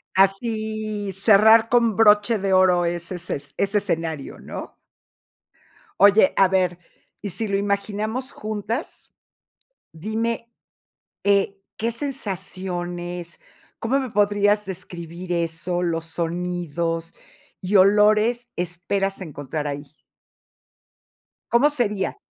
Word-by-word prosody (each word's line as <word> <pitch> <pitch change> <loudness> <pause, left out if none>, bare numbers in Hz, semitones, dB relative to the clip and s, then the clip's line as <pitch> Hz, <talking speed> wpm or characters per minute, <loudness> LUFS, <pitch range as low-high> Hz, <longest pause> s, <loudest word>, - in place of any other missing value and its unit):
Así, 215 +1 0
cerrar 220 +3 +6
con 235 -4 +3
broche 210 +1 +5
de 195 -1 0
oro 180 -2 +4
ese 170 +1 -3
esces 145 -5 -5
ese 200 +1 +1
escenario, 160 -6 -3
¿no? - - -8 1.2
Oye, 200 0 +6
a 195 - +6
ver, 180 -2 +1 0.4
¿y 205 - -4
si 220 +5 -3
lo 200 - -1
imaginamos 210 +5 -2
juntas? 215 +5 -5 0.8
Dime, 225 +6 -3 0.7
eh, 200 0 +2 0.2
¿qué 230 +2 -1
sensaciones? 180 - -5 0.4
¿Cómo 265 +5 +1
me 260 -2 -3
podrías 205 0 +2
describir 175 -1 -7
eso? 170 +1 -1
Los 165 -2 -1
sonidos 170 -1 -2 0.5
y 190 +3 -2
olores 210 +5 +4
esperas 185 +3 -2
encontrar 145 -2 -5
ahí. 145 0 -6 1.6
¿Cómo 245 +5 +5
sería? 215 - -1
195 Hz, 100 wpm, -23 LUFS, 175-215 Hz, 1.6 s, cerrar